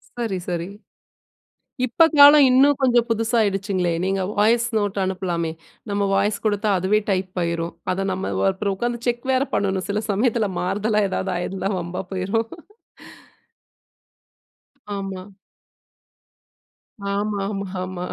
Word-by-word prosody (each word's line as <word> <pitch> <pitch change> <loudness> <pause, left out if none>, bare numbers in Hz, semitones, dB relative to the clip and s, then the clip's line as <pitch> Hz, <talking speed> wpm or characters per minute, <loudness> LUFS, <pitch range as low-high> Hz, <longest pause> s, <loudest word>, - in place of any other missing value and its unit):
சரி, 230 -5 -2
சரி. 170 0 -2 1.2
இப்ப 255 +7 +4
காலம் 285 0 +9
இன்னும் 270 +2 +5
கொஞ்சம் 240 -2 +3
புதுசா 225 +1 0
ஆகிடுச்சுங்களே! 195 -3 0
நீங்க 195 0 0 0.2
வாய்ஸ் 230 +3 +3
நோட் 205 -1 -1
அனுப்பலாமே! 180 -3 -2 0.4
நம்ம 200 0 0
வாய்ஸ் 200 +1 +1
கொடுத்தா, 210 0 +1
அதுவே 195 +4 +2
டைப் 185 -1 -1
ஆயிரும். 170 0 -2 0.2
அத 195 +1 -2
நம்ம 190 +1 -3 0.2
அப்புறம் 195 +1 -2
உட்கார்ந்து 240 +3 -3
செக் 240 0 -1
வேற 260 +2 +2
பண்ணனும். 190 -1 -1
சில 205 +1 0
சமயத்தில 220 0 +1
மாறுதலா 210 +4 0
ஏதாவது 190 0 -2
ஆயிருந்தா 190 +2 -3
வம்பா 175 +2 -4
போயிரும். 195 +5 -1 2.5
ஆமா. 195 -1 -5 1.8
ஆமா, 205 +1 -1
ஆமா, 200 -1 -4 0.2
ஆமா 185 -1 -5
200 Hz, 120 wpm, -22 LUFS, 190-225 Hz, 2.5 s, காலம்